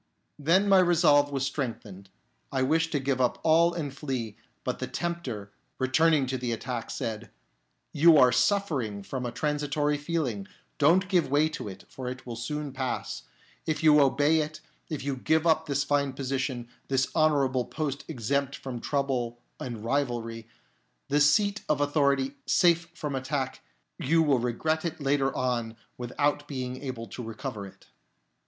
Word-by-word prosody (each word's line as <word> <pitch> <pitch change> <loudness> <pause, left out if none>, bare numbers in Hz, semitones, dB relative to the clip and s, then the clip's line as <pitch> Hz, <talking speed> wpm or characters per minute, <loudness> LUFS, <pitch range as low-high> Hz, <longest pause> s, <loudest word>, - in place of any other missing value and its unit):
" - - -48
Then 190 +4 +5
my 195 -1 +6
resolve 155 -5 +4
was 135 -1 -1
strengthened, 110 -9 -5 0.4
I 130 -2 +1
wished 165 +4 +2
to 145 - +2
give 135 -1 0
up 125 - +2
all 165 +2 +5
and 145 -5 -4
flee; 130 -7 -4 0.3
but - - -3
the - - -3
Tempter, 130 -13 -4 0.3
returning 145 +2 +3
to 130 0 -3
the 120 -1 -2
attack, 120 +1 -4
said, 110 -1 -4 0.3
" - - -48
You 165 -1 +8
are 125 -3 +7
suffering 135 - +1
from 125 +3 -4
a - - -4
transitory 150 +1 0
feeling; 145 -11 -2 0.3
don't 175 +7 +4
give 175 -7 +2
way 150 +3 +3
to 155 - -6
it, 95 - -9
for 130 -1 -7
it 125 0 -6
will 120 -2 -5
soon 145 +5 -4
pass. 130 -1 -4 0.4
If 155 0 -1
you 150 -1 +7
obey 145 +3 +3
it, 155 0 -3 0.3
if 155 -5 -4
you 140 -1 -1
give 160 +5 +1
up 160 -1 +3
this 140 -1 +1
fine 140 -1 +1
position, 130 -2 -3 0.2
this 135 -1 +1
honourable 140 -5 +2
post 145 -3 -3
exempt 140 0 -1
from 130 -3 -6
trouble 130 -4 -1 0.2
and 115 -3 -6
rivalry, 115 -4 -2 0.6
this 145 +1 +5
seat 205 +4 +2
of 150 -2 +2
authority 140 -2 +1
safe 170 -1 +3
from 150 -4 -4
attack, 130 0 -2 0.4
you 165 +4 +3
will 140 -5 +3
regret 155 +7 -1
it 170 -3 -3
later 140 -1 +1
on 120 -3 -1 0.2
without 145 +4 -1
being 130 -2 -5
able 130 -4 -5
to 125 - -7
recover 110 -2 -6
it." 95 - -17
140 Hz, 165 wpm, -28 LUFS, 125-155 Hz, 0.6 s, You